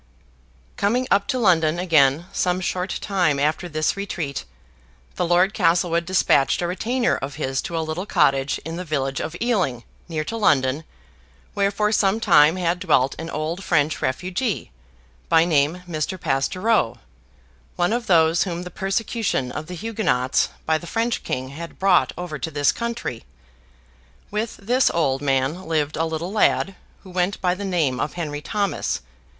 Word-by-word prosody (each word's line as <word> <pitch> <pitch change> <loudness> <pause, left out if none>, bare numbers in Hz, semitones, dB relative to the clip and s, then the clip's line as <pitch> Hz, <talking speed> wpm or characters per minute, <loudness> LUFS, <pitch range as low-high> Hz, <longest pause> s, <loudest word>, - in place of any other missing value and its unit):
Coming 240 +5 +1
up 200 0 +3
to 260 - 0
London 170 -8 +3
again 160 -3 +3
some 180 0 +1
short 185 0 -2
time 175 -8 +1
after 155 +4 0
this 155 -1 0
retreat, 175 -8 -4 0.7
the 175 - 0
Lord 180 +4 +3
Castlewood 170 0 +2
despatched 175 -5 +3
a - - +1
retainer 235 +8 0
of 135 +1 -5
his 135 -3 -2
to 170 - -4
a 160 - -1
little 165 +5 -4
Cottage 140 -6 +2
in 165 +1 -5
the 180 - -4
village 135 -5 -2
of 160 - -5
Ealing, 185 - 0 0.3
near 155 -2 -2
to 225 +9 -5
London, 145 -6 +2 0.7
where 200 0 +2
for 210 +1 0
some 205 0 +2
time 160 -7 +5
had 180 -1 0
dwelt 140 -8 +2
an 165 +1 -5
old 160 +5 -3
French 150 -2 +1
refugee, 185 - -2 0.6
by 165 0 +5
name 160 +2 +1
Mr. 170 +3 -3
Pastoureau, 175 - +1 0.8
one 175 +4 +1
of 240 -1 -2
those 165 -2 +4
whom 175 -2 -2
the 180 - -8
persecution 195 - -1
of 155 +4 -6
the 180 - -6
Huguenots 195 - 0 0.2
by 160 0 +2
the 175 - -10
French 230 +3 -1
king 130 0 -3
had 165 +5 -8
brought 190 -2 +3
over 175 -4 -5
to 160 - -3
this 145 -2 +2
country. 235 - -4 1.1
With 215 +2 -3
this 245 +6 +2
old 135 -5 0
man 140 +5 0
lived 155 -2 0
a 165 - 0
little 160 +3 -3
lad, 205 -2 +2 0.3
who 190 - -12
went 180 +2 0
by 180 -2 +1
the 195 +2 -6
name 160 -9 0
of 150 - -2
Henry 150 -4 -4
Thomas. 200 +3 -1
170 Hz, 165 wpm, -22 LUFS, 150-195 Hz, 1.1 s, time